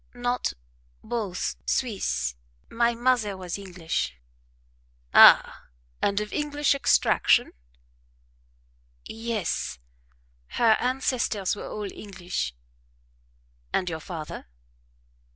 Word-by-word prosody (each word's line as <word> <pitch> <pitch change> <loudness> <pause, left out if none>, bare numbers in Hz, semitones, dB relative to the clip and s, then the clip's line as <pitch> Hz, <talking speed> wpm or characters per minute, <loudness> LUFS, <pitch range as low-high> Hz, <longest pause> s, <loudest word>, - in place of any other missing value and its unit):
"Not 245 0 -1 0.5
BOTH 215 -6 -3
Swiss: 70 - -1 0.4
my 235 0 +2
mother 235 -5 +1
was 185 +1 -5
English." 175 - -3 1.0
"Ah! - - +7 0.4
and 200 0 +2
of 210 0 -5
English 295 -1 +1
extraction?" 280 - +3 1.5
"Yes 220 - -3 0.8
her 225 -2 +5
ancestors 250 -6 0
were - - -7
all 205 -2 -5
English." 185 - -5 1.2
"And 180 - 0
your 160 - -4
father?" 160 - -7
210 Hz, 80 wpm, -26 LUFS, 180-240 Hz, 1.5 s, Ah